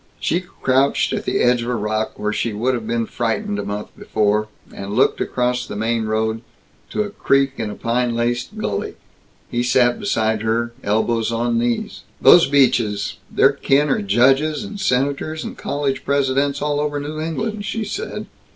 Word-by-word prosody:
She 170 - +1
crouched 135 -7 +1
at - - -3
the - - 0
edge 125 0 +3
of 120 - -3
a 125 - 0
rock, 110 0 -2
where 105 0 -1
she 115 0 -1
would 120 +5 0
have 115 -3 -3
been 115 0 0
frightened, 205 - -2
a - - -2
month 105 +1 -5
before, 105 0 0 0.3
and 100 +1 -6
looked - - +3
across 125 0 -1
the - - -6
main 110 +1 0
road 110 +1 -1 0.5
to 215 - 0
a 205 - -6
creek 135 -7 +2
in 105 - -3
a - - -6
pine 120 0 0
laced 120 - -1
gully. 100 - -3 0.6
He 120 - 0
sat 120 0 +3
beside 110 - 0
her, 115 +1 0
elbows 110 +2 +1
on 115 0 0
knees. 120 0 -2 0.2
"Those 175 - +7
Beaches 120 -7 +2
their - - +4
kin 145 +2 +2
are - - +1
judges 135 - +3
and 205 0 -7
senators 145 0 0
and - - -6
college 140 -2 -2
Presidents, 140 0 +1
all 145 -1 0
over 145 -1 -1
New 150 +2 -5
England," 205 +7 -3
she 225 +1 -2
said. 445 - -5
125 Hz, 180 wpm, -20 LUFS, 110-145 Hz, 0.6 s, Those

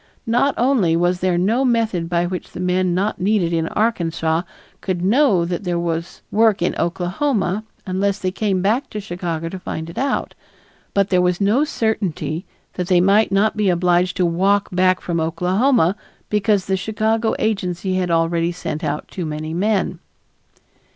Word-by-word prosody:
Not 245 +4 +2
only 235 -10 +2
was 175 +1 +1
there 180 -1 +1
no 220 +9 +2
method 225 -9 0
by 175 0 +1
which 180 0 -5
the - - -7
men 180 0 +1
not 200 +3 -1
needed 190 -3 +1
in 165 -1 0
Arkansas 165 -7 0 0.4
could 180 -2 -2
know 205 - +3
that 175 +2 -3
there 175 -2 -1
was 170 0 -3
work 220 -4 +3
in - - +1
Oklahoma 190 +3 -1 0.2
unless 195 +1 0
they 185 -2 -2
came 195 -2 -1
back 225 +7 +1
to 210 - -5
Chicago 175 -4 -4
to 185 +3 -6
find 160 -2 -5
it - - -6
out, 275 +1 -1 0.6
but 200 0 +2
there 180 -1 +4
was 180 -1 +1
no 210 +8 +3
certainty 200 - -2 0.3
that 180 -1 -3
they 180 -2 +4
might 200 +3 +4
not 200 +2 +2
be 210 -2 +1
obliged 180 +1 +2
to 180 - +2
walk 195 +4 +2
back 185 0 +2
from 170 -2 -2
Oklahoma 185 +5 +2 0.4
because 210 -2 +2
the 190 0 0
Chicago 220 +3 0
agency 185 -3 -1
had 180 -1 -1
already 165 0 +1
sent 165 -2 -5
out 150 0 -2
too 175 -4 -5
many 155 +1 -4
men. 190 -1 0
185 Hz, 170 wpm, -20 LUFS, 175-210 Hz, 0.6 s, there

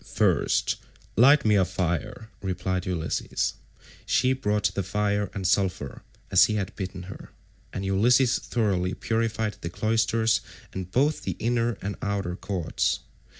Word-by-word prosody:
"First - - +1 0.4
light 140 +4 +6
me 105 - +4
a 95 - +5
fire," 95 +4 -3
replied 95 0 -2
Ulysses. 85 -3 -1 0.5
She 130 +1 +2
brought 105 -6 0
the 100 - -1
fire 100 +1 0
and 95 -2 -1
sulphur, 90 -8 0 0.3
as - - +7
he 105 - -1
had 100 -3 -3
bidden 95 -1 -5
her, 95 +2 -10 0.4
and 95 - -4
Ulysses 120 +6 +4
thoroughly 100 -5 0
purified 110 -1 -1
the 85 - -4
cloisters 110 +3 +1 0.3
and 95 -1 -5
both 145 +9 +2
the - - -3
inner 120 0 +1
and 100 +1 -3
outer 100 -3 -2
courts. 90 -4 -1
100 Hz, 140 wpm, -26 LUFS, 95-115 Hz, 0.5 s, as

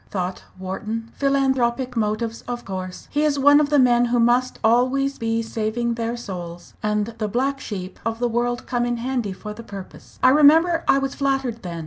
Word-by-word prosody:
thought 185 -1 -4
Wharton. 215 +5 -5
"Philanthropic 265 -2 +1
motives 225 +1 -1
of 245 0 -5
course. 185 -1 -6
He 295 - 0
is 300 -2 +2
one 285 +1 +6
of 295 -1 +1
the 295 - +3
men 245 -2 +4
who 240 0 +1
must 245 +2 +2
always 255 +4 +2
be 230 0 0
saving 225 +2 -2
their 230 +1 -3
souls, 175 -6 -8
and 210 +1 -1
the 215 - -1
black 265 +6 -1
sheep 190 -6 -6
of 225 0 -2
the 245 +1 0
world 240 +1 -1
come 240 -1 -1
in 240 0 -1
handy 240 -3 -2
for 210 +3 -7
the 220 - -9
purpose. 200 -4 -11
I - - +8
remember 320 +4 +5
I - - +5
was 275 0 -1
flattered 270 -4 -1
then. 170 -2 -6
235 Hz, 190 wpm, -22 LUFS, 215-265 Hz, -, I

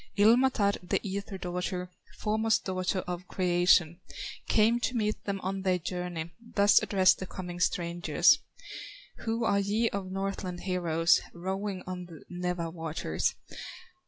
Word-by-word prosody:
Ilmatar, 220 -1 +4
the 180 - 0
ether 195 0 -4
daughter, 180 0 -3 0.3
Foremost 220 +1 +1
daughter 185 0 -1
of 180 0 -5
creation, 175 -2 +3 0.5
Came 225 +2 +4
to 250 +1 -1
meet 215 -2 -1
them 200 -1 -2
on 195 +1 -3
their 185 -1 +2
journey, 175 -1 -4 0.2
Thus 200 0 +6
addressed 190 -2 +4
the 185 - -5
coming 180 -2 -7
strangers: 175 -1 +3 0.8
"Who 230 +1 -2
are 200 -2 +3
ye 210 +3 +1
of 190 -2 -4
Northland 195 -2 -3
heroes, 170 -2 +2
Rowing 190 +2 -3
on 180 -1 -5
the 165 -3 -12
Nawa 180 -2 -2
waters?" 160 - -2
185 Hz, 130 wpm, -29 LUFS, 175-200 Hz, 0.8 s, Thus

